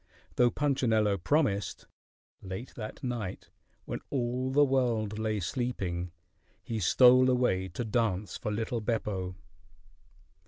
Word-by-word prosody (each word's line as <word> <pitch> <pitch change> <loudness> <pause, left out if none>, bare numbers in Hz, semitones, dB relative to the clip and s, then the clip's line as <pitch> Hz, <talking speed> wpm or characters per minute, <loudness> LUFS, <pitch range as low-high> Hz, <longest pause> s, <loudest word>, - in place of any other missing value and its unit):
Though 125 -1 +5
Punchinello 115 -8 +1
promised, 100 - 0 0.6
late 95 +6 -7
that 110 -2 -7
night, 100 -8 -4 0.3
when - - -4
all 125 0 -1
the 145 +2 +4
world 115 -6 0
lay 110 -1 -1
sleeping, 90 -5 -3 0.5
he 115 -1 -3
stole 125 +6 +6
away 125 -7 +2
to 95 +7 -5
dance 105 -3 -1
for 105 - -3
little 110 +2 -2
Beppo. 100 -5 -2
110 Hz, 115 wpm, -30 LUFS, 100-125 Hz, 0.6 s, stole